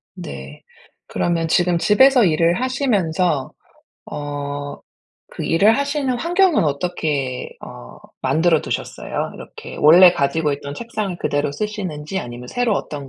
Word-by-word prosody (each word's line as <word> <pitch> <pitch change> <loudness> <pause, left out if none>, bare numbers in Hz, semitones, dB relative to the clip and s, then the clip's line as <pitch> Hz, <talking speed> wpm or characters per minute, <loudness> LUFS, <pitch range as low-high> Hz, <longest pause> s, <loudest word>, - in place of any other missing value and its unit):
네. 70 +1 -9 0.4
그러면 170 -1 -1
지금 175 +1 +2
집에서 250 +7 +5
일을 170 +1 +2
하시면서 185 - 0 0.6
어 145 -1 -5 0.6
그 - - -6
일을 205 +8 +4
하시는 280 -2 -1
환경은 350 +4 +2
어떻게 145 -4 -2
어 - - -11 0.3
만들어 160 -1 +2
두셨어요? - - -4
이렇게 - - -10
원래 175 +4 +8
가지고 150 -1 0
있던 140 0 -6
책상을 215 -3 -4
그대로 145 -2 -1
쓰시는지 190 -1 -4
아니면 120 +1 -8
새로 240 - 0
어떤 145 -7 -5
165 Hz, 290 characters per minute, -20 LUFS, 145-215 Hz, 0.6 s, 원래